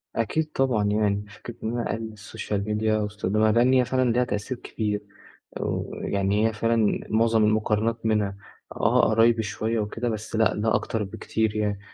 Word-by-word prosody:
أكيد 155 +8 -1
طبعًا 130 -7 +1
يعني، 105 0 +1
فكرة 115 +3 -10
إن 110 - -1
أنا 120 - -2
أقلِّل 110 0 -5
السوشيال 105 -1 -4
ميديا 110 0 +1
واستخدامها، 105 +1 +1
لإن 120 +4 +4
هي 125 -1 +4
فعلًا 130 -1 +1
ليها 125 +2 +2
تأثير 105 +3 -3
كبير 105 -3 -3 0.6
و - - -3
يعني 100 +2 +1
هي 115 - -2
فعلًا 115 -1 +1
معظم 110 0 +3
المقارنات 110 +1 +1
منها، 105 -3 +1 0.4
آه، - - +3
قرايبي 115 +1 +4
شوية 110 +2 -2
وكده، 115 +3 -2
بس 110 0 -4
لأ 110 0 +3
ده 110 +1 +1
أكتر 110 -2 -1
بكتير 110 +1 -2
يعني، 105 -2 -1
110 Hz, 165 wpm, -25 LUFS, 105-115 Hz, 0.6 s, لإن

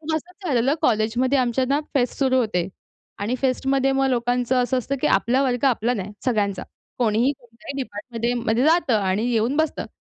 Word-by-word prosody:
पण 315 0 -2
असंच 360 +4 -8
झालेलं 265 +2 +2
कॉलेजमध्ये 240 +4 +2
आमच्यांना 260 +3 +1
फेस्ट 250 -3 0
सुरू 260 -2 +2
होते 185 -7 0 0.5
आणि 210 +5 -2
फेस्टमध्ये 270 +1 +1
मग 270 0 +1
लोकांचं 245 +1 0
असं 255 +1 0
असतं, 270 +3 -3
की - - +1
आपला 240 +7 +2
वर्ग 250 0 0
आपला 245 -1 +1
नाही 200 -1 -5
सगळ्यांचा. 205 -6 0 0.4
कोणीही 235 +4 +2
कोणत्याही 235 +3 -10
डिपार्टमेंटमध्ये 235 +2 -4
मध्ये 225 +4 +2
जातं 310 -8 +3
आणि 200 +5 0
येऊन 235 +5 +1
बसतं. 315 -1 -1
245 Hz, 170 wpm, -23 LUFS, 225-270 Hz, 0.5 s, जातं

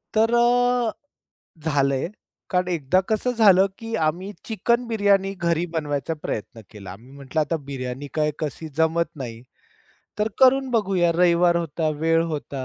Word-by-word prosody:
तर 225 +2 +3
अ, 245 0 +3 0.7
झालंय 140 -2 +1 0.4
कारण 180 -1 0
एकदा 170 +1 +1
कसं 220 +3 0
झालं, 200 -5 +5
की 225 -1 -7
आम्ही 170 +5 -1
चिकन 235 +2 0
बिर्याणी 200 -3 +2
घरी 170 -2 0
बनवायचा 145 -2 -2
प्रयत्न 115 +2 -5
केला. 100 -4 -10
आम्ही 115 +8 -13
म्हटलं, 140 +2 -3
आता 160 +2 -1
बिर्याणी 130 +1 -5
काय, 150 -1 +1
कशी 155 +1 -4
जमत 165 +1 +2
नाही, 115 -4 -7 0.8
तर 210 +1 +1
करून 265 +1 +5
बघूया. 195 -7 +2
रविवार 175 0 +3
होता, 165 -1 -1
वेळ 165 +1 +3
होता. 145 -3 -5
170 Hz, 140 wpm, -23 LUFS, 145-210 Hz, 0.8 s, झालं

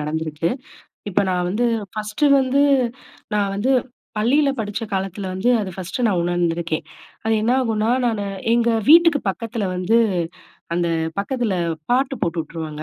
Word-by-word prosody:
நடந்திருக்கு. 155 +1 -2 0.6
இப்ப 200 0 +1
நான் 180 -1 0
வந்து, 235 +5 +1 0.3
ஃபர்ஸ்ட்டு 215 +6 -1
வந்து, 265 +2 +2 0.7
நான் 200 -1 +1
வந்து 225 +7 +1 0.5
பள்ளியில 275 +7 +3
படிச்ச 210 0 -3
காலத்தில 195 +1 -3
வந்து 190 +6 0
அது 190 -2 -4
ஃபர்ஸ்ட்டு 190 +6 -3
நான் 185 -5 +1
உணர்ந்துருக்கேன். 170 -2 -1 0.4
அது 225 - +1
என்னாகும்னா, 230 -2 +1
நான் 225 -4 0 0.3
எங்க 235 0 +3 0.2
வீட்டுக்கு 330 -2 +7
பக்கத்தில 230 +1 -4
வந்து 185 +6 +2 0.8
அந்த 175 -1 +1 0.3
பக்கத்தில 235 0 -1 0.4
பாட்டு 265 +2 +2
போட்டு 170 0 -1
உட்டுருவாங்க. 155 -1 -7
205 Hz, 130 wpm, -21 LUFS, 175-240 Hz, 0.8 s, வீட்டுக்கு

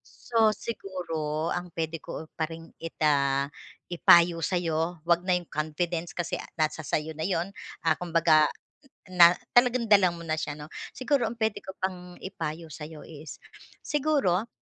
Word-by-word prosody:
So, 220 -2 +1
siguro 165 -7 -3
ang 175 0 -3
puwede 165 -1 -2
ko 160 - -8
pa 160 -1 -2
rin 165 0 -10
ita 140 -4 +1 0.5
ipayo 170 0 +6
sa 180 +3 0
'yo 165 -1 -1
huwag 170 0 +3
na 180 0 +2
'yong 175 -2 -5
confidence 165 +3 -2
kasi 175 -1 -2 0.2
nasa 155 0 0
sa'yo 155 +1 -2
na 160 +4 -2
'yon, 185 +1 -1 0.3
ah, 160 - +4
kumbaga 165 -3 +4 0.6
na 175 -1 +8 0.2
talagang 245 -1 +4
dala 195 -3 +7
mo 170 - -9
na 160 -1 -1
siya 150 -1 -3
'no. 150 +1 -10 0.2
Siguro 255 -2 +1
ang 230 - -5
puwede 220 -2 -1
ko 190 - -9
pang 180 -1 -4
ipayo 165 -3 -5
sa'yo 150 +1 -9
is, 155 -1 -10 0.5
siguro 275 - +1
170 Hz, 155 wpm, -27 LUFS, 155-185 Hz, 0.6 s, na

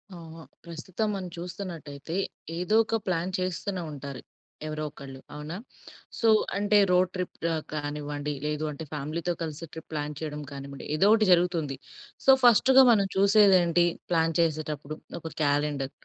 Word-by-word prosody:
ఆహ! 165 -1 -10 0.2
ప్రస్తుతం 170 +5 -4
మనం 185 -2 -5
చూస్తున్నట్టయితే 170 -3 -6 0.4
ఏదో 180 +5 0
ఒక 225 - -2
ప్లాన్ 180 0 0
చేస్తూనే 185 +1 -2
ఉంటారు, 140 -2 -7 0.5
ఎవరో 155 0 -4
ఒకళ్ళు 135 -1 -11 0.2
అవునా? 150 +4 -6 0.6
సో, 230 - +2 0.3
అంటే 205 +1 +3
రోడ్ 180 0 +4
ట్రిప్ 180 -1 -4 0.2
అ - - +1 0.2
కానివ్వండి 145 0 -3
లేదు 150 0 -2
అంటే 150 +2 -7
ఫ్యామిలీతో 155 +4 -2
కలిసి 160 0 -4
ట్రిప్ 160 0 -10
ప్లాన్ 150 0 -3
చేయడం 150 -1 -5
కానివ్వండి, 140 0 -8
ఏదో 190 +6 +4
ఒకటి 220 -1 +5
జరుగుతుంది. 170 -5 +2 0.5
సో, 270 - +8
ఫస్ట్‌గా 260 +3 +7
మనం 200 -4 +3
చూసేది 200 0 +6
ఏంటి 170 0 +3 0.3
ప్లాన్ 165 -1 +2
చేసేటప్పుడు 155 -2 -1 0.2
ఒక 160 -1 -7
క్యాలెండర్. 145 -1 0
165 Hz, 140 wpm, -27 LUFS, 150-185 Hz, 0.6 s, సో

